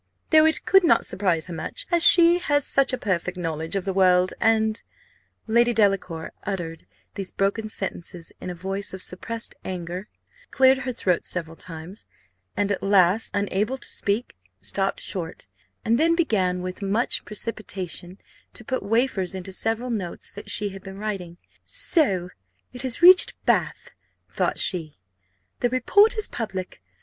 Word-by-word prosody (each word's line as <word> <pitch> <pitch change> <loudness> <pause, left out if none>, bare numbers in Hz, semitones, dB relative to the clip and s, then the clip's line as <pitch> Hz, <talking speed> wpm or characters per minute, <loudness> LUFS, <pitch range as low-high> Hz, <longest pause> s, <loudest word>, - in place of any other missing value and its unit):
Though 315 0 +6
it 320 - +1
could 385 0 +5
not 335 - +3
surprise 180 -5 0
her 180 - -8
much, 160 - -5
she 340 +1 +8
has 290 -5 +1
such 275 -1 +2
a 255 - -2
perfect 180 -3 -2
knowledge 165 0 -4
of 195 - -2
the 195 - -1
world, 185 -1 +3
and 220 -1 +1 0.3
" - - -36 0.2
Lady 235 +2 +3
Delacour 195 -6 0
uttered 170 -5 -5 0.3
these 195 -2 -5
broken 200 +3 -1
sentences 175 -4 -6
in - - -6
a 180 - -5
voice 195 +2 -5
of 185 - -5
suppressed 225 +6 -4
anger; 180 +1 -6 0.4
cleared 265 0 +4
her 255 -1 -3
throat 185 -7 -1
several 165 -2 -5
times, 165 +4 -10 0.5
and 205 0 0
at 200 - -2
last, 195 +1 +3
unable 205 +5 -1
to - - -9
speak, 205 - -2 0.2
stopped 195 0 -2
short, 175 -3 -6 0.4
and 230 +3 +2
then 335 +2 +3
began 185 - 0
with 185 +2 -6
much 205 +5 0
precipitation 195 -4 -5 0.4
to 240 - -9
put 260 - -2
wafers 200 -4 0
into 190 0 -6
several 225 +5 -2
notes 190 -7 -5
that 205 +1 -10
she 205 0 0
had 195 0 -10
been 195 0 -10
writing. 195 -5 -5 0.3
So 275 - +4 0.4
it 250 - -3
has 260 +4 -2
reached 370 +1 +7
Bath, - - 0 0.4
thought - - -2
she 165 -6 -1 0.6
the 245 - +1
report 405 - +3
is 430 - +3
public! 190 - -5
200 Hz, 160 wpm, -24 LUFS, 180-235 Hz, 0.6 s, she